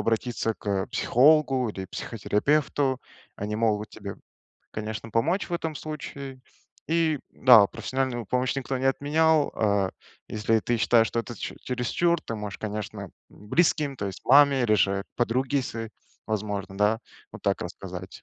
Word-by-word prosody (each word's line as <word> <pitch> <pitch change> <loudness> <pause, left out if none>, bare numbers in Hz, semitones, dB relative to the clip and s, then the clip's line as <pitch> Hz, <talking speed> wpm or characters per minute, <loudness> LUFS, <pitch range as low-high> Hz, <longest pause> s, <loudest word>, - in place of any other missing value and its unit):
обратиться 115 0 -1
к 100 -3 -2
психологу 135 -1 +3
или 95 -2 -6
психотерапевту. 130 +6 0 0.4
Они 105 +1 -3
могут 110 -1 0
тебе, 100 -2 -8 0.6
конечно, 110 0 -5
помочь 165 - +1
в - - -9
этом 160 -2 -3
случае. 140 -3 -7 0.5
И, 160 -3 +1
да, 120 -6 +7
профессиональную 120 0 -3
помощь 125 +5 0
никто 135 0 -2
не 135 - 0
отменял. 150 +3 +2
А, 100 -3 +2 0.4
если 110 +1 +1
ты 120 - 0
считаешь, 115 0 +4
что 115 - -1
это 115 +1 -8
чере - - -6
чересчур, 145 +7 0
ты 115 - -6
можешь, 105 -1 -6
конечно, 105 -1 -5
м, 95 - -8 0.2
близким, 150 - 0
то 100 - -3
есть 95 - -7
маме 140 -1 +6
или 110 -3 +3
же 100 -1 +1
подруге 130 +3 +1
своей, 115 -2 -5 0.4
возможно, 100 -3 -3
да, 105 +2 +3 0.3
вот - - -10
так - - 0
рассказать. - - -8
120 Hz, 150 wpm, -26 LUFS, 105-140 Hz, 0.6 s, да